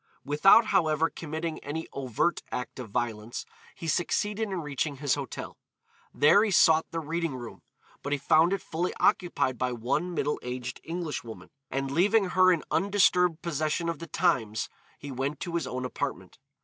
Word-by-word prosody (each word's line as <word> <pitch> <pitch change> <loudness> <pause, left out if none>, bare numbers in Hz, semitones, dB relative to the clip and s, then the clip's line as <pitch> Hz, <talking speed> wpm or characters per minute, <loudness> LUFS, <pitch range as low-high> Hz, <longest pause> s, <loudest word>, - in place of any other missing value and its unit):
Without, 195 +10 +6
however, 160 -3 +2
committing 160 0 -4
any 160 +3 -5
overt 135 +5 0
act 125 +1 -5
of 125 -4 -7
violence, 110 +1 -3 0.3
he 165 - -7
succeeded 205 +6 0
in 190 -2 -2
reaching 145 0 -2
his 140 0 0
hotel. - - -5 0.5
There 180 +8 +5
he 220 - +1
sought 160 -4 +5
the 165 - -3
reading 165 -1 -2
room, 120 -2 -9 0.4
but 140 - -5
he 145 - +2
found 155 +5 +4
it 195 - -1
fully 170 +3 -2
occupied 130 -8 +1
by 125 -1 0
one 150 +10 -1
middle 150 -1 0
aged 125 0 -5
Englishwoman, 160 -9 -5 0.2
and 135 0 -2
leaving 195 +5 +3
her 185 0 +5
in 170 -4 +1
undisturbed 180 -4 +3
possession 155 +1 -1
of 165 - -3
the 165 - -7
Times, 120 - 0 0.3
he 140 - -8
went 135 +3 -3
to 170 - -4
his 165 -6 -1
own 130 0 -3
apartment. 125 -8 -5
155 Hz, 165 wpm, -28 LUFS, 130-175 Hz, 0.5 s, Without